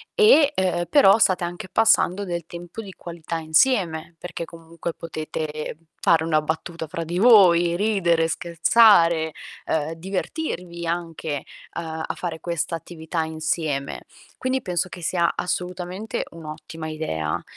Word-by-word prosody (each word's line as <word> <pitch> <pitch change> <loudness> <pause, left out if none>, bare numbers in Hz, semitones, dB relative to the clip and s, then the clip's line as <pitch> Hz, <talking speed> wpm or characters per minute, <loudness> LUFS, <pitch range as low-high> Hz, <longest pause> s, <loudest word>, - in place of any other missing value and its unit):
e, 425 - +6
ehm, 180 -2 0
però 225 -8 +6
state 185 -4 +3
anche 175 +2 -5
passando 200 -2 +3
del 170 -2 -4
tempo 175 +5 -8
di 195 -3 -10
qualità 170 -1 -6
insieme, 165 0 +1
perché 170 -1 -6
comunque 165 0 -7
potete 155 -2 -5 0.2
fare 160 -1 +4
una 155 -2 +2
battuta 160 +1 -4
fra 165 +2 -4
di 175 +3 -3
voi, 175 -7 +6
ridere, 175 -5 +2
scherzare, 170 -2 +4 0.3
ehm, 160 +1 -1
divertirvi 180 - -4
anche, 165 -4 -3 0.3
uhm, 160 -1 -4
a - - -2
fare 165 -3 -4
questa 170 -1 -2
attività 160 0 -4
insieme. 160 -3 -2 0.3
Quindi 260 0 -1
penso 180 0 -1
che 175 - -9
sia 170 0 +1
assolutamente 180 +3 -3
un'ottima 160 0 -8
idea 80 - -3
170 Hz, 130 wpm, -23 LUFS, 160-180 Hz, 0.3 s, e